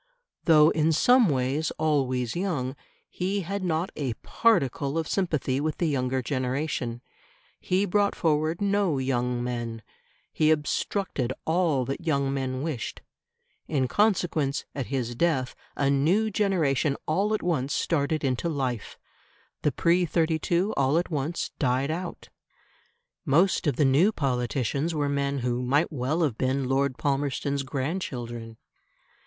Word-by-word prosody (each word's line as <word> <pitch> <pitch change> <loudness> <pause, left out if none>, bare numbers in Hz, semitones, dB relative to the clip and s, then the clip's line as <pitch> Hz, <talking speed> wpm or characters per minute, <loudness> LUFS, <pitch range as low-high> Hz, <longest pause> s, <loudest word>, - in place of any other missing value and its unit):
Though 155 -2 +6
in 160 0 +2
some 245 - +5
ways 135 +3 0
always 130 -6 0
young, 155 -8 -2 0.3
he 195 +2 -2
had 195 +2 -4
not 170 0 -1
a 130 -6 -2
particle 150 - +1
of 160 -1 -1
sympathy 150 -8 0
with 155 0 -2
the 175 - 0
younger 130 -3 0
generation; 130 -1 -2 0.6
he 185 +2 +1
brought 205 +1 +1
forward 155 +1 0
no 200 -6 +1
young 125 -2 -1
men; 120 -2 -4 0.5
he 155 - +3
obstructed 150 - 0
all 160 -6 +1
that 135 +6 -4
young 140 -4 0
men 130 -1 -2
wished. 150 -9 -4 0.7
In 135 -4 0
consequence, 165 - +1
at 135 -4 -4
his 125 -3 -2
death 130 -2 0 0.2
a 140 -1 +1
new 180 +11 +2
generation 160 -9 +1
all 200 +7 +1
at - - -4
once 145 -6 0
started 155 0 0
into 135 +5 0
life; 130 -7 -3 0.6
the 150 - +2
pre 170 +6 +2
'32 170 +4 +1
all 135 +3 +2
at 175 +1 -1
once 150 +3 -2
died 135 +1 +1
out. 175 +2 -5 0.9
Most 170 +4 +3
of 145 - +2
the 145 - +3
new 145 +10 +4
politicians 135 - -1
were 145 -1 0
men 140 0 0
who 125 0 0
might 140 +7 +1
well 150 +4 0
have 130 -7 -1
been 130 0 0
Lord 135 0 +1
Palmerston's 140 0 -1
grandchildren. 130 -5 -4
145 Hz, 135 wpm, -26 LUFS, 130-170 Hz, 0.9 s, Though